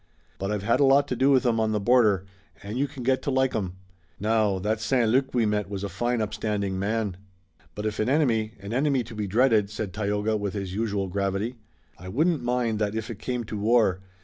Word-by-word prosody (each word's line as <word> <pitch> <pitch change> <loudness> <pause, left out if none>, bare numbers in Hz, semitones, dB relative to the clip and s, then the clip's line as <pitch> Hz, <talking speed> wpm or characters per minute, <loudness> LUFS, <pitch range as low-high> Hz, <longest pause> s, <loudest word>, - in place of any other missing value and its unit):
But 95 - -2
I've 105 -2 -2
had 115 +3 +2
a - - +5
lot 140 +1 +5
to 125 - -1
do 130 +3 +3
with 135 -2 +4
'em 115 -2 +2
on 110 -1 +1
the 105 - +1
border, 105 -4 +3 0.4
and 100 +2 -6
you 140 +3 +1
can 130 -2 -9
get 130 +1 +2
to - - -3
like 130 -1 +1
'em. 95 -5 -2 0.5
Now, 105 -1 +2
that 105 +3 -1
St. 120 +1 +2
Luc 130 +4 +2
we 120 -2 +3
met 105 -1 -1
was 100 -1 -4
a 100 - -3
fine 120 +4 -1
upstanding 105 -3 -2
man." 105 -2 -1 0.6
"But 105 - -5
if 110 0 -2
an 110 +3 +1
enemy, 115 -7 +2
an 100 +3 -6
enemy 135 0 +2
to 115 +1 -11
be 105 -2 -3
dreaded," 110 -1 +3
said 105 -3 -5
Tayoga 105 +2 0
with 100 -2 -3
his 95 -2 -4
usual 100 -2 -1
gravity. 100 +5 -2 0.4
"I 90 +1 -8
wouldn't 155 - +1
mind 120 -3 0
that 105 0 -1
if 110 +1 -3
it 110 - -8
came 125 0 -3
to 105 -1 -6
war. 105 -4 +3
110 Hz, 230 wpm, -26 LUFS, 100-125 Hz, 0.6 s, a